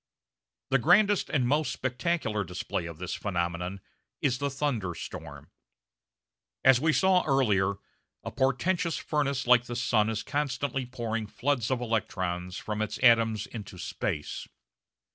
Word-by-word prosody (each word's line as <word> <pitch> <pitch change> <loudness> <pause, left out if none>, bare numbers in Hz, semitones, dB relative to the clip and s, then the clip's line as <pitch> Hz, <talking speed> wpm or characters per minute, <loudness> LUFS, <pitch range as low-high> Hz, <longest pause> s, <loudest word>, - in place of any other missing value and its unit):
The 135 - +4
grandest 195 - +4
and 130 -5 +1
most 150 +3 +1
spectacular 130 - -1
display 90 -1 -4
of 85 -2 -8
this 90 +1 -4
phenomenon 90 0 -2 0.4
is 125 -2 +1
the 140 - 0
thunderstorm. 125 - -4 1.1
As 130 -1 +7
we 160 +1 +3
saw 185 +2 +4
earlier, 105 -8 +2 0.5
a - - -5
portentous 165 +6 +1
furnace 140 -3 -1
like 125 -1 +5
the 120 - -5
sun 115 -3 +2
is 110 -1 -2
constantly 135 -2 -2
pouring 115 -3 -3
floods 125 0 -1
of 130 -2 0
electrons 95 -6 -2
from 105 0 -4
its 110 - -2
atoms 115 -3 +5
into 105 -4 -8
space. 75 -3 -4
120 Hz, 130 wpm, -28 LUFS, 105-140 Hz, 1.1 s, As